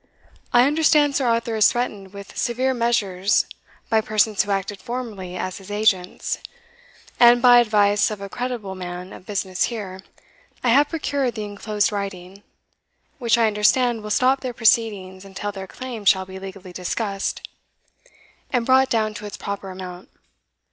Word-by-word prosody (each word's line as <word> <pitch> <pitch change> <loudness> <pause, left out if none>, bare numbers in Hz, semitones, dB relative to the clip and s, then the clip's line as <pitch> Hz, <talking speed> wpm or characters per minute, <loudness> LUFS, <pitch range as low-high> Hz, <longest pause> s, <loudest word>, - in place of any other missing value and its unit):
I 245 +1 +6
understand 295 -1 +3
Sir 265 -3 +1
Arthur 230 -1 0
is 215 -2 +5
threatened 210 -6 -3
with 200 0 -11
severe 255 +2 0
measures 220 -5 +1 0.4
by 220 -1 +3
persons 215 -1 +2
who 205 - -5
acted 195 0 -2
formerly 215 -7 -6
as 185 +1 -4
his 195 0 -13
agents; 205 -3 0 0.8
and, 240 0 +7
by 245 0 +7
advice 205 -3 +3
of 210 -2 -5
a 200 - -6
creditable 240 -3 -4
man 180 0 -7
of 185 - -13
business 190 -3 -1
here, 200 -5 -6 0.6
I 250 - +2
have 280 +5 +5
procured 285 -6 -1
the 215 - -4
enclosed 205 0 -1
writing, 195 -1 -6 0.8
which 235 -2 +2
I 230 - +4
understand 220 +3 +2
will 210 - -7
stop 260 +5 +2
their 250 -2 -5
proceedings 205 -5 +1
until 195 +1 -5
their 190 -1 -8
claim 245 0 -7
shall 190 -1 +4
be 190 0 -9
legally 190 -1 -9
discussed, 195 +2 -3 1.0
and 245 -3 +1
brought 265 +1 +4
down 215 -2 0
to 210 0 -7
its 205 - -8
proper 200 -1 -5
amount. 185 -1 -9
210 Hz, 155 wpm, -22 LUFS, 195-240 Hz, 1.0 s, and